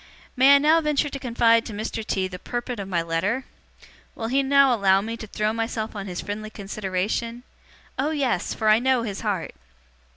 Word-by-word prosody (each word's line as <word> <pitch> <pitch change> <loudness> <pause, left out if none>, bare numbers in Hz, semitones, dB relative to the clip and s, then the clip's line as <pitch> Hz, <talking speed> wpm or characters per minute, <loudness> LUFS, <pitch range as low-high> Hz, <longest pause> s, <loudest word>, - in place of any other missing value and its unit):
'May 270 +2 +7
I - - +8
now 310 +3 +4
venture 300 -1 +1
to 275 - -6
confide 230 -2 +3
to 225 - -7
Mr. 220 +1 -4
T. 190 -3 -1
the 180 -1 -8
purport 240 +1 -4
of 195 - -5
my 175 -3 0
letter? 190 +10 -1 0.7
Will 225 0 -4
he 270 +3 +2
now 275 -1 +4
allow 195 -4 +4
me 225 +3 -4
to 225 -1 -9
throw 210 +1 -1
myself 225 -1 -3
on 200 -1 -5
his 180 -2 -4
friendly 215 +1 -5
consideration? 210 +3 -3 0.6
Oh 280 +3 +1
yes, 265 - -1
for 220 - -1
I 215 +1 +6
know 255 -1 +2
his 205 -4 -5
heart! 200 -6 -2
225 Hz, 195 wpm, -24 LUFS, 200-255 Hz, 0.7 s, I